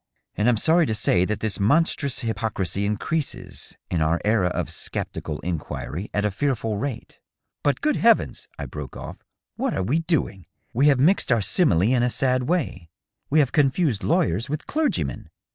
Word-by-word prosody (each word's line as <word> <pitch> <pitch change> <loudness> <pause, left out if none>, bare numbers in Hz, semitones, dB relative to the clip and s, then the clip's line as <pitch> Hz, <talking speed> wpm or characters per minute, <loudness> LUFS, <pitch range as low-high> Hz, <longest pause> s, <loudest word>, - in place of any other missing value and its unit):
And 105 +4 +2
I'm 120 - +3
sorry 160 +6 +3
to 110 - -1
say 90 -4 +2
that 105 +2 -3
this 110 -2 -2
monstrous 140 +4 +2
hypocrisy 110 -4 -1
increases, 140 +9 -3
in 85 - 0
our 80 +2 +2
era 105 -4 +3
of 90 - -3
sceptical - - -5
inquiry, 90 +3 -4
at 105 0 0
a 105 - +1
fearful 115 -2 -1
rate... 135 0 -5 0.4
But 145 - 0
good 300 0 +1
heavens 230 -1 +2
!" - - -31
I - - -5
broke 70 -3 -7
off, - - -8 0.2
" - - -65
what - - -1
are 95 - 0
we 135 - +1
doing? 160 - -1 0.3
We 135 +5 +3
have 140 -3 +4
mixed 165 +2 +3
our 120 - +4
simile 100 - +3
in 120 +4 +3
a 125 - +2
sad 130 +1 +1
way; 125 - -1 0.4
we 150 - +2
have 135 - 0
confused 140 - +2
lawyers 140 - +1
with 150 +1 -3
clergymen. 310 0 -1
120 Hz, 180 wpm, -24 LUFS, 100-150 Hz, 0.4 s, have